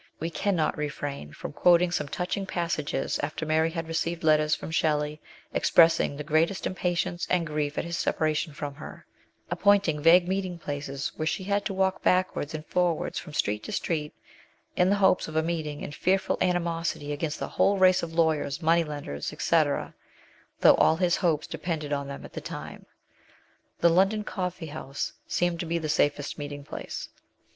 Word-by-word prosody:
We 165 +2 -3
cannot 170 -4 0
refrain 145 - -4
from - - -7
quoting 175 0 +4
some 150 -4 -1
touching 190 +5 -3
passages 165 -6 -2
after 155 +2 -3
Mary 160 +1 +2
had 165 -1 -4
received 165 +1 -2
letters 155 -1 +4
from - - -7
Shelley 150 -1 0 0.3
expressing 165 -3 +4
the 150 - -4
greatest 160 +5 +1
impatience 175 -1 -1
and 180 -2 +2
grief 150 -1 -2
at - - 0
his 170 +1 -3
separation 155 +1 0
from 145 0 -5
her, 145 - -10 0.5
appointing 200 -7 +3
vague 175 +3 +6
meetinglplaces 170 -8 -3
where 155 - -2
she 190 - -1
had 200 +1 0
to 195 - -2
walk 190 0 +1
backwards 180 -4 +1
and 155 0 -6
forwards 175 -2 0
from 150 - -10
street 105 +1 0
to - - -6
street, 150 -3 -2 0.6
in 180 +1 +3
the 200 - +4
hopes 190 -2 +3
of: 155 - -8
a 160 - +2
meeting, 155 -3 -3
and - - -6
fearful 190 +5 +1
animosity 170 -4 -1
against 150 +1 -3
the - - -4
whole 200 0 +2
race 185 -1 +5
of 170 - -5
lawyers, 160 -4 +1
money 165 0 +3
lenders, 145 - -5
&c., - - +1 1.1
though - - +8
all 160 - +5
his 175 0 +2
hopes 165 -5 +1
depended 160 -2 -3
on 140 -1 -2
them 140 - -7
at - - -12
the - - -5
time. - - -8 0.9
The 170 - +6
London 195 +5 +3
Coffee 180 -4 -4
House 145 -2 -5
seemed 175 -1 0
to 170 - -3
be 170 +1 0
the 160 -2 -3
safest 145 -1 0
meeting 145 0 -6
place. - - -6
165 Hz, 175 wpm, -27 LUFS, 150-180 Hz, 1.1 s, though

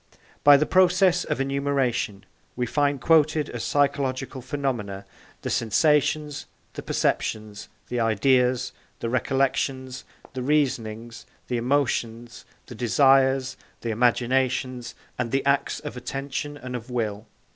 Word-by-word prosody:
By 145 -1 +8
the 150 - +1
process 185 0 +3
of - - -2
enumeration, 135 -7 -1 0.3
we 125 - -1
find 140 +3 0
quoted 155 0 +3
as 120 - -5
psychological 135 -2 0
phenomena, 120 -9 -3 0.4
the - - -3
sensations, 150 +4 +1 0.3
the - - -6
perceptions, 105 -1 -2 0.2
the 125 - -2
ideas, 125 +3 +2 0.3
the 115 - -3
recollections, 130 0 -1 0.3
the 130 - -4
reasonings, 120 -5 -1 0.2
the 125 - 0
emotions, 120 -2 -1 0.2
the 125 - -10
desires, 130 +2 +3 0.2
the 115 - -2
imaginations, 125 +1 0 0.2
and 120 -2 -1
the 135 0 0
acts 140 0 +1
of 150 -3 -7
attention 140 +3 -5
and 125 -3 -7
of 120 +1 -7
will. 110 -3 -3
130 Hz, 120 wpm, -25 LUFS, 120-140 Hz, 0.4 s, By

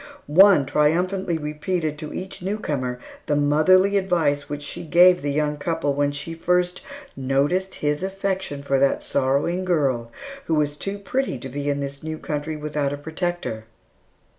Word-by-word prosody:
One 180 -1 +6
triumphantly 170 +5 +1
repeated 150 +1 -3
to 155 - -6
each 185 0 -6
newcomer 150 -11 -2 0.3
the 145 - +2
motherly 185 +7 +4
advice 155 -7 0
which 145 0 -5
she - - -6
gave 180 +2 +5
the 145 - -2
young 150 0 0
couple 155 -1 -1
when 145 0 +1
she 145 +3 -6
"first 180 +2 0 0.3
noticed 140 +8 0
his 150 +1 -1
affection 190 -6 -3
for 135 -1 +1
that 140 0 +2
sorrowing 140 +7 0
girl, 135 -10 0 0.3
who 160 -2 +1
is 145 -1 0
too 195 +6 -4
pretty 230 - -2
to 130 +2 -8
be 145 +2 -3
in 145 0 -1
this 140 0 -5
new 155 0 -5
country 155 +1 -4
without 150 -2 -2
a 145 - -3
protector." 160 -7 -4
150 Hz, 160 wpm, -23 LUFS, 145-180 Hz, 0.3 s, One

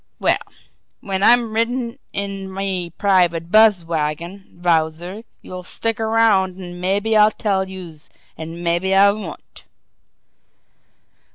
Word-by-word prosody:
Well, - - +2 0.6
when 195 -1 -3
I'm 235 +1 +4
ridin' 235 +2 -1
in 195 -1 -5
me 190 -2 -3
private 175 -2 +1
buzz 215 -5 +5
wagon, 170 +4 -4
Wowzer, 170 +4 0 0.2
youse 180 -1 -8
stick 225 0 -2
around 220 -4 +2
an' 175 -1 -8
mabbe 200 +4 0
I'll 210 0 +6
tell 195 -3 -1
youse 170 -5 -10 0.3
an' 165 +2 -8
mabbe 175 +3 +1
I 200 +1 +6
won't!" 210 +1 -9
190 Hz, 115 wpm, -20 LUFS, 175-210 Hz, 0.6 s, I'll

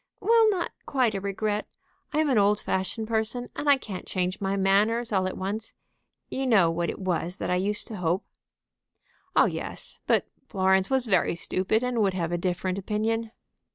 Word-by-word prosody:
"Well, 445 +1 +5
not 370 -4 -1 0.2
quite 255 -5 +2
a 195 - -3
regret. 205 +2 -2 0.4
I - - -2
am 310 -1 +3
an 235 - +4
old 205 +1 +3
fashioned 190 +4 -2
person, 230 +2 -1
and 290 - -1
I 280 - +7
can't 200 -8 -7
change 185 +1 -2
my 195 0 0
manners 210 +5 +2
all 190 -2 +2
at 185 - -5
once. 205 +4 -4 0.6
You 265 0 -1
know 195 -9 +5
what 170 0 -1
it - - -4
was 180 -1 -2
that - - -3
I - - +3
used 205 +3 -1
to 220 - -6
hope." 180 +1 0 1.1
"Oh - - +6
yes. - - -5
But - - +3 0.2
Florence 190 -2 +2
was 265 -2 +2
very 185 -5 +2
stupid, 190 +6 0
and 250 -2 0
would 195 -3 +2
have 170 -2 -1
a 175 - 0
different 180 +1 -1
opinion." 220 +3 -1
205 Hz, 190 wpm, -27 LUFS, 185-230 Hz, 1.1 s, I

